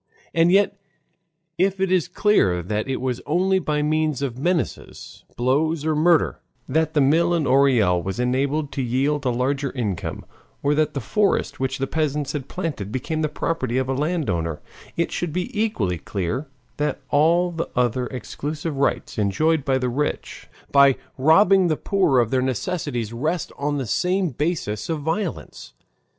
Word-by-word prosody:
And 165 +1 +4
yet 200 +1 +3 0.8
if 190 +1 +2
it 190 -1 +1
is 180 -3 +2
clear 175 - +2
that 105 +6 -2
it 135 - -1
was 125 -1 -2
only 190 +4 +2
by 150 -3 -1
means 155 -2 0
of 130 -4 -2
menaces, 175 +2 -3
blows, 145 +5 +1
or 160 -1 +1
murder, 165 +1 +3 0.3
that 160 +3 0
the 150 - +4
mill 165 +5 +3
in 160 -3 0
Orel 125 -9 +3
was 95 +4 -4
enabled 140 +4 0
to 135 - -3
yield 135 +4 0
a - - +3
larger 135 +3 -1
income, 105 -9 -3 0.4
or 145 - +3
that 150 0 +1
the 140 - -2
forest 205 - 0
which 130 0 -1
the 135 - -1
peasants 150 -1 -1
had 140 -3 -5
planted 150 - -4
became 145 +6 -2
the 155 - 0
property 130 -5 -2
of 130 -1 0
a 135 - 0
landowner, 130 - -1 0.4
it 170 - 0
should 175 -2 -2
be 180 +3 -3
equally 115 - 0
clear 100 - -3 0.3
that 150 0 -1
all 170 +4 +3
the 165 -1 -4
other 125 0 +1
exclusive 145 +5 -5
rights 135 -4 -1
enjoyed 155 +10 +1
by 135 -1 +1
the 125 -1 -1
rich, 145 +5 -3 0.2
by 140 -1 +6 0.2
robbing 185 +6 +5
the 155 -3 0
poor 185 -9 +2
of 120 -3 +2
their 130 -1 +2
necessities, 125 - -2
rest 155 +8 -2
on 145 +1 -1
the 135 - -2
same 180 - 0
basis 145 - -2
of 160 -2 -2
violence. 165 +4 -4
145 Hz, 165 wpm, -23 LUFS, 125-165 Hz, 0.8 s, by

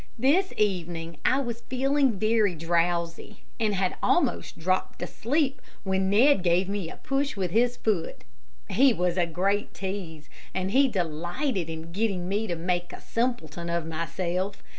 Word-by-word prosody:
This 305 - +3
evening 170 -5 -1
I 265 +2 +3
was 235 -3 -4
feeling 270 +1 +2
very 215 -3 +2
drowsy, 170 +3 -1 0.2
and 215 -3 +1
had 185 -1 0
almost 290 -8 +1
dropped 185 +2 -1
asleep, 275 +2 0 0.2
when 190 -1 +1
Ned 235 +4 +5
gave 180 +1 +2
me 200 -4 -3
a - - -9
push 275 +1 -1
with 185 -3 -1
his 240 +4 +2
foot. 205 -7 -1 0.5
He 260 +4 +5
was 180 -1 0
a 175 -2 +2
great 195 +5 0
tease, 185 -6 -5 0.3
and 190 0 -1
he 270 +4 +5
delighted 175 - -2
in 160 +1 -6
getting 195 -2 -1
me 205 +4 -1
to 175 - -1
make 175 +1 -1
a - - -8
simpleton 175 - -2
of 170 -1 -1
myself. 175 +4 -3
190 Hz, 155 wpm, -27 LUFS, 170-235 Hz, 0.5 s, Ned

